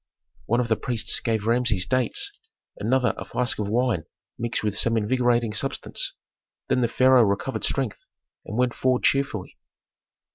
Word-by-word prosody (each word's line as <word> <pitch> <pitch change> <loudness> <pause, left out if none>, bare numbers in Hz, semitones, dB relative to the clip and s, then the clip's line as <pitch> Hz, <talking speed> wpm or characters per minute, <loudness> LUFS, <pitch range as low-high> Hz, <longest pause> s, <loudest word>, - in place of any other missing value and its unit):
One 120 +2 +2
of 125 - 0
the 110 - +2
priests 120 -4 -1
gave 110 -3 -1
Rameses 115 -5 +2
dates, 130 - 0 0.5
another 125 +2 +2
a - - -4
flask 125 -2 -1
of 105 -1 -2
wine 115 -7 +1 0.3
mixed 115 -1 -2
with 105 -1 -1
some 115 +2 +1
invigorating 120 0 +1
substance. - - -2 0.5
Then 125 - +2
the 120 - +3
pharaoh 130 +2 +5
recovered 105 +5 0
strength 130 -7 -1 0.4
and 105 - -6
went 125 -1 +2
forward 130 -1 +1
cheerfully. 135 -9 0
120 Hz, 150 wpm, -25 LUFS, 110-125 Hz, 0.5 s, pharaoh